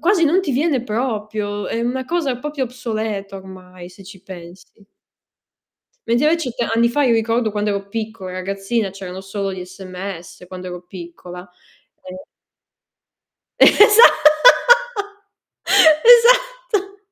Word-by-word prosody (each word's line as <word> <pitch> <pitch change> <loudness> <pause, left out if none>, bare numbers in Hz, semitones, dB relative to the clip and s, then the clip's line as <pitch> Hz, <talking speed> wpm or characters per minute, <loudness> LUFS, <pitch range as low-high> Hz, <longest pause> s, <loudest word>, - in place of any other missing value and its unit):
quasi 350 +2 +2
non 335 +5 +2
ti 370 - -4
viene 275 -1 -1
proprio, 215 -3 -4
è 230 - -4
una 250 +2 -3
cosa 295 -7 -2
proprio 290 0 -4
obsoleta 220 -5 -6
ormai, 185 -2 -13
se 185 +2 -16
ci 190 -1 -15
pensi. 185 +2 -14 1.2
Mentre 240 +6 +1
invece 330 -5 -1
t 235 - -9
anni 230 +1 +1
fa, 290 +5 -1
io 250 -4 +2
ricordo 225 0 -1
quando 210 0 -2
ero 200 0 -5
piccola 215 -3 -7
e - - -9
ragazzina, 195 +3 -3
c'erano 190 -1 -9
solo 195 0 -5
gli 185 -1 -7
sms, 185 -1 -10
quando 185 0 -9
ero 180 0 -9
piccola, 180 0 -12 0.6
e 185 - -10 1.5
Esa 425 +2 +6 2.0
esatto. 485 -4 +3
215 Hz, 125 wpm, -18 LUFS, 190-260 Hz, 2.0 s, Esa